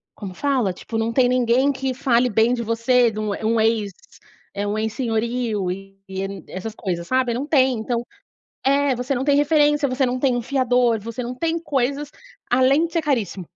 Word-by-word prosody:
como 195 -3 -7
fala, 260 -10 0
tipo, 225 +5 -6
não 225 +1 -1
tem 250 -1 +3
ninguém 250 +2 +3
que 265 -1 -3
fale 250 -2 +2
bem 225 +3 +3
de 240 - -2
você, 235 +2 +2
do 215 -1 -3 0.2
um 230 0 +2
ex 220 -2 +1 0.6
eh, 205 0 -3
um 210 - -2
ex-senhorio 220 -3 -1
e 195 +1 -9 0.5
essas 210 +4 -6
coisas, 175 -4 -4
sabe? 255 -2 +1
Não 260 +5 -3
tem, 260 -6 +3
então 235 +1 -2 0.6
é, 280 -1 +3
você 250 +3 -2
não 255 - -1
tem 285 0 +3
referência, 295 -1 +3
você 260 +1 +1
não 255 +1 -2
tem 255 -2 +2
um 245 - -1
fiador, 250 -3 +1
você 230 +4 -6
não 245 +1 -5
tem 330 +4 -1
coisas, 280 -1 -1 0.4
além 270 +6 +4
de 330 - -18
ser 335 - +1
caríssimo. 225 - -1
245 Hz, 185 wpm, -22 LUFS, 225-270 Hz, 0.6 s, além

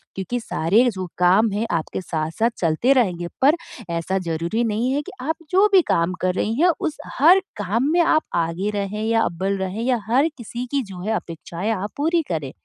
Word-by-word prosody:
क्योंकि 195 +6 -3
सारे 200 +3 +2
जो 185 -3 -5
काम 190 +5 +4
हैं 210 +3 -1
आपके 165 +2 -2
साथ-साथ 165 +6 -1
चलते 170 +11 +2
रहेंगे 180 -10 +1
पर 285 +4 +6 0.3
ऐसा 170 +3 -1
ज़रूरी 170 +6 -2
नहीं 225 +3 0
है 285 - 0
कि - - -10
आप 315 +5 -1 0.2
जो 385 +3 +5
भी 380 - +8
काम 170 +2 +1
कर 185 0 +1
रही 215 - 0
हैं 355 +1 +6
उस 310 - -2 0.2
हर 340 +7 +7 0.2
काम 210 +6 0
में 345 - +3
आप 315 -1 +3
आगे 170 +4 -1
रहें 205 +1 -3
या 225 0 +2
अव्वल 190 +3 -1
रहें 190 +3 -3
या 245 -1 +1
हर 265 +8 +3
किसी 240 +1 -6
की 280 -1 +1
जो 180 -2 -8
है 215 +4 -1
अपेक्षाएँ 170 +3 -4
आप 205 -1 -3
पूरी 330 +4 +2
करें 150 -5 -3
210 Hz, 200 wpm, -22 LUFS, 175-250 Hz, 0.3 s, भी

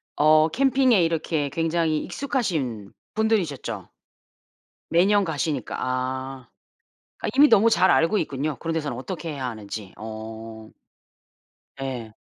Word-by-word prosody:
어 155 +1 +5
캠핑에 260 - +3
이렇게 160 -3 -1
굉장히 165 0 0
익숙하신 155 - -2 0.2
분들이셨죠? 165 - -1 1.0
매년 200 +4 +4
가시니까. 160 - -2
아. 130 0 -3 0.7
아 - - -3
이미 290 +2 +7
너무 220 +3 +6
잘 190 -4 +4
알고 165 +6 +3
있군요. 145 -1 -2
그런 165 -1 -3
데서는 155 -3 -2
어떻게 170 +5 -5
해야 135 -3 -4
하는지. 105 -3 -7
어. 110 0 -8 1.1
예. 125 -5 -5
155 Hz, 255 characters per minute, -24 LUFS, 125-180 Hz, 1.1 s, 이미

